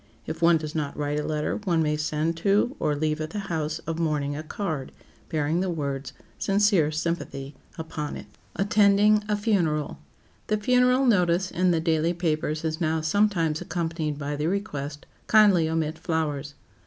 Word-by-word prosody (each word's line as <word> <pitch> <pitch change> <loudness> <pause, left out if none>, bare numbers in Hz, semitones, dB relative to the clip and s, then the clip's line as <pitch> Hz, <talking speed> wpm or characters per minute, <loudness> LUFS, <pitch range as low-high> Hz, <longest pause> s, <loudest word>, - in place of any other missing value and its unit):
If 160 - -6
one 170 0 +6
does 155 -1 -6
not 145 -3 -3
write 145 0 -1
a - - -2
letter, 150 0 -1
one 170 -5 +2
may 150 0 +1
send 155 +2 -1
to 205 - +2
or 150 - +1
leave 155 +1 -1
at 155 - -3
the 210 - -6 0.2
house 155 -1 -1
of 165 +1 -3
mourning 150 -3 0
a 155 - -4
card, 155 -4 -4 0.4
bearing 155 +2 0
the 190 0 0
words, 140 -4 -3 0.3
"Sincere 195 -5 +3
sympathy," 155 -3 -3 0.2
upon 160 -2 -5
it. - - -9
[Sidenote: - - -26 0.3
ATTENDING 210 0 +4
A 210 - +2
FUNERAL] 175 -9 0 0.5
The 215 - +1
funeral 250 +4 +3
notice 180 -5 +2
in 185 +1 +2
the 170 -2 +2
daily 160 +1 +1
papers 155 -2 -1
is 160 +2 -2
now 160 -1 +1
sometimes 165 -2 +1
accompanied 160 -3 -3
by 145 0 -3
the 150 +2 -1
request, 150 -7 -3 0.2
"Kindly 200 -7 +5
omit 160 -1 -1
flowers." 150 -3 -2
160 Hz, 170 wpm, -26 LUFS, 150-185 Hz, 0.5 s, one